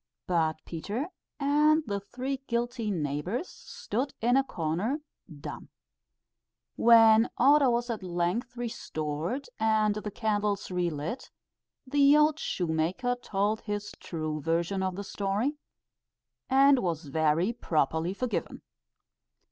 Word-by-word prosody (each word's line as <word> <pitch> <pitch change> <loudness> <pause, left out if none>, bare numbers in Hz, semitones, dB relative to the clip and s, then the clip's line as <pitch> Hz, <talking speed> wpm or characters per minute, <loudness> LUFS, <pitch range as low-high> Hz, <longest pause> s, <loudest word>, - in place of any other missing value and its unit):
But 160 -3 +1
Peter 210 - -4 0.3
and 300 +2 +3
the 200 -3 -2
three 255 +7 -4
guilty 235 -1 -1
neighbours 175 - -2
stood 260 +6 -5
in 240 +2 +3
a 270 - +4
corner 195 - -2 0.4
dumb. - - -8 1.1
When 225 -1 +6
order 280 +1 +6
was 240 0 0
at 220 - -4
length 185 +8 -2
restored, 170 - -3
and 215 -1 +3
the 210 0 -4
candles 210 -2 -1
re 180 -1 0
lit, 155 - -5 0.6
the 285 +2 +5
old 300 +1 +3
shoemaker 175 +9 -1
told 210 0 -1
his 205 -1 -4
true 155 -2 -4
version 170 +5 0
of 185 -1 -1
the 200 - -5
story, 205 +9 -2 0.9
and 275 0 +6
was 170 -6 -2
very 160 - +1
properly 160 - 0
forgiven. 250 +2 -3
210 Hz, 115 wpm, -29 LUFS, 170-250 Hz, 1.1 s, When